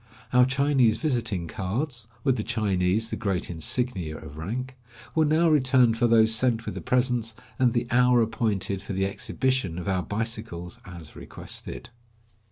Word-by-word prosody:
Our 125 0 +6
Chinese 130 -3 +2
visiting 115 - -1
cards 120 - -3
— - - -31
with 135 -3 +2
the - - -2
Chinese 100 +1 0
the - - -1
great 95 -4 -2
insignia 85 -1 0
of 80 -2 -11
rank 125 +11 -5 0.2
— 115 - -18
were 160 -1 +3
now 160 +3 +3
returned 130 -6 +4
for 120 +1 +2
those 110 -1 +5
sent 115 0 +1
with - - -4
the - - -6
presents, 125 -3 +1 0.2
and 125 -3 +3
the 120 - 0
hour 125 0 +4
appointed 105 -3 -1
for 100 - -6
the 95 +1 0
exhibition 115 -2 -1
of 90 - -5
our 95 -2 +1
bicycles 105 -4 -4
as 85 -4 -10
requested. - - -6
115 Hz, 170 wpm, -26 LUFS, 95-125 Hz, 0.2 s, Our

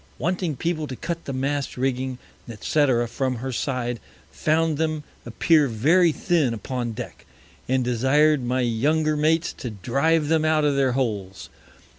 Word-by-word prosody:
Wanting 175 +1 -1
People 155 +1 -2
to 130 - -6
cut 170 +5 -5
the - - -4
Mast 140 +1 -2
Rigging, 130 0 -1 0.4
&c. 130 -2 +2
from 130 +2 -2
her 130 +3 -4
Side, 120 -2 -2 0.3
found 155 -1 +1
them 155 -1 -1 0.2
appear 150 +6 +3
very 160 +10 +3
thin 155 -7 +1
upon 120 +1 -4
Deck, - - -8 0.4
and 130 0 +1
desired 135 +4 +3
my 125 +1 0
younger 150 +7 +1
Mates 160 +2 +1
to 125 - -6
drive 140 - +1
them 160 0 +2
out 155 -1 +2
of 145 -1 +2
their 135 -2 +2
Holes. 105 -7 -3
135 Hz, 150 wpm, -24 LUFS, 125-155 Hz, 0.4 s, appear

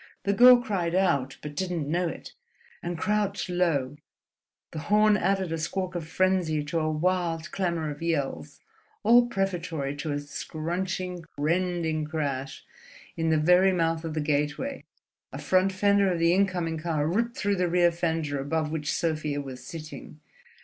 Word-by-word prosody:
The 200 - +1
girl 250 +4 +9
cried 185 -8 -2
out, 140 -8 +1
but 150 -1 -6
didn't 175 -5 -2
know 175 +3 0
it, - - -8 0.5
and 175 -1 -4
crouched 205 +1 -1
low; 150 -6 0 0.7
the 155 - -5
horn 210 0 +5
added 190 -2 0
a 165 - -2
squawk 185 +3 -3
of 170 -3 -5
frenzy 180 -4 +1
to 150 +3 -2
a 155 0 0
wild 170 0 -1
clamour 170 -5 -1
of 145 - -9
yells; 140 - -2 0.4
all 240 +2 +6
prefatory 175 -9 -2
to 150 +1 -3
a 145 - -1
scrunching, 175 +5 -4
rending 165 0 0
crash 140 -4 -4 0.5
as, 165 - -3
in 165 - +2
the 160 - +3
very 180 +5 +5
mouth 165 -2 0
of 160 -1 -4
the 155 - 0
gateway, 150 - -1 0.5
a - - -6
front 185 +1 +2
fender 200 0 +3
of 175 - -1
the 170 +1 +3
incoming 180 -4 0
car 155 -2 -1
ripped 230 +9 -1
through 200 -1 0
the 180 0 +1
rear 175 0 +4
fender 160 -4 -2
above 155 +2 -1
which 150 -2 -2
Sofia 155 -3 -1
was 130 -3 -7
sitting. 155 -1 -9
170 Hz, 165 wpm, -27 LUFS, 155-185 Hz, 0.7 s, girl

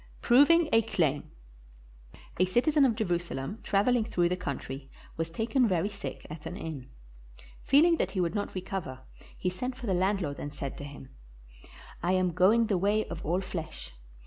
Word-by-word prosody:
] - - -25
PROVING 305 +7 +6
A 225 - +6
CLAIM 160 -10 0 1.1
A 185 - +5
CITIZEN 275 - +3
of 235 -4 +2
Jerusalem 175 - -2
traveling 220 +4 +2
through 175 -6 +1
the 180 - 0
country 135 -5 -6 0.3
was 165 0 -2
taken 230 - +1
very 185 0 +1
sick 200 -1 -7
at 155 0 -8
an 180 - -6
inn. 155 -9 -7 0.7
Feeling 325 +5 +5
that - - 0
he - - +2
would 170 -2 0
not 205 -2 -3
recover, 180 -8 -5 0.4
he 180 - -1
sent 250 +8 -4
for 255 -1 -8
the 195 - 0
landlord 185 -5 0
and 145 - -5
said 140 -2 -5
to - - -6
him, 140 -2 -10 0.9
"I 175 +2 +1
am 185 -1 +2
going 215 +7 +4
the 200 -5 0
way 205 +3 +2
of - - -6
all 175 +5 0
flesh. 160 - -7
185 Hz, 175 wpm, -29 LUFS, 165-225 Hz, 1.1 s, PROVING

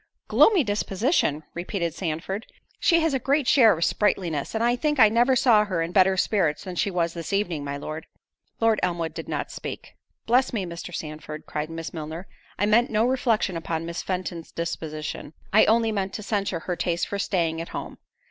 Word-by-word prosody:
"Gloomy 395 -8 +5
disposition!" 205 - 0
repeated 175 -1 -3
Sandford: 180 +5 -4 0.3
"She 335 -1 +4
has 320 -2 +1
a 265 - +1
great 275 +2 +1
share 225 - +6
of 170 - +1
sprightliness—and 190 0 0
I 240 +1 +3
think 295 +3 0
I 220 - +8
never 240 +4 +3
saw 235 -4 +5
her 180 -5 -1
in 165 - -4
better 190 0 +4
spirits 180 -6 +1
than 185 -2 -6
she 200 - +1
was 170 -3 -1
this 170 +1 -6
evening, 180 -7 -1
my 140 0 -4
Lord." 155 +2 -6 0.5
Lord 225 -2 +3
Elmwood 170 -3 -1
did - - -7
not - - -3
speak. - - -7 0.3
"Bless 250 +2 +3
me, 205 -5 -1
Mr. 170 +1 -7
Sandford," 155 -1 -7
cried 150 +1 -4
Miss 165 0 -6
Milner, 160 +2 -6 0.3
"I 205 - +2
meant 230 +4 +4
no 220 +1 +2
reflection 240 -7 +1
upon 165 0 -3
Miss 170 +1 -4
Fenton's 180 -3 -4
disposition; 155 -2 -5 0.2
I 215 - +7
only 225 0 +3
meant 195 -2 -2
to 215 - -5
censure 195 -5 -1
her 180 - -3
taste 170 0 -1
for 200 - -4
staying 165 -5 0
at 165 - -7
home." - - -7
185 Hz, 190 wpm, -25 LUFS, 165-220 Hz, 0.5 s, I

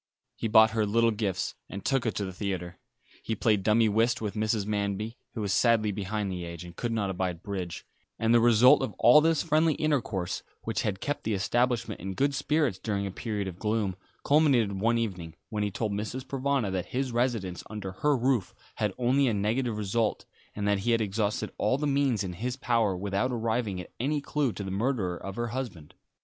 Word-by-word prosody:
He - - -2
bought 110 0 +6
her 110 -1 +1
little 115 +2 +3
gifts, 100 -4 -2 0.2
and 100 0 -7
took 135 -3 +1
her - - +2
to 100 - -2
the 95 - -6
theatre. 90 -2 -4 0.4
He 110 - -2
played 105 -1 +2
dummy 110 +3 +4
whist 115 +3 +2
with 105 -2 -3
Mrs. 110 -1 0
Manby, 105 +2 -2 0.2
who 110 - -3
was 100 -2 0
sadly 110 0 +3
behind 100 0 -3
the 90 -1 -4
age, 85 0 -7
and 85 -1 -11
could 120 +5 -3
not 105 -4 0
abide 90 -2 -3
bridge; 95 -5 -5 0.3
and 115 +1 +2
the 120 - +7
result 120 +2 +6
of 130 - -2
all 150 - +7
this 160 -1 +2
friendly 155 -1 +3
intercourse, 120 - -1 0.2
which 115 +4 -1
had 105 -6 -2
kept 145 - -2
the 110 -1 0
establishment 115 +1 0
in 95 +1 -5
good 140 +5 +1
spirits 145 - 0
during 100 -2 -2
a 100 - -3
period 105 -1 -3
of 90 -1 -7
gloom, 105 -3 0 0.3
culminated 140 -8 +4
one 115 +2 +3
evening, 90 -8 -3
when 105 -2 -2
he 105 - +1
told 105 +2 -2
Mrs. 110 +6 -4
Provana 135 -5 0
that 90 -2 -2
his 130 0 -2
residence 115 -7 -1
under 105 -3 -5
her 145 +9 +1
roof 125 -4 0 0.2
had 105 -3 -1
only 130 +3 +3
a 115 - +1
negative 110 +3 0
result, 105 +2 -1 0.3
and 105 -1 -2
that 100 -1 +2
he 115 +4 +1
had 115 - +2
exhausted 105 +1 -1
all 110 +6 +2
the 150 - -2
means 140 -7 +1
in 90 -2 -4
his 120 +8 -3
power 115 -6 +1
without 100 +6 -1
arriving 115 -4 -1
at 90 - -9
any 145 +5 0
clue 145 -2 0
to 100 - -5
the 95 - -5
murderer 100 -3 0
of 95 +2 -7
her 120 0 -2
husband. 115 - -6
110 Hz, 210 wpm, -28 LUFS, 100-120 Hz, 0.4 s, the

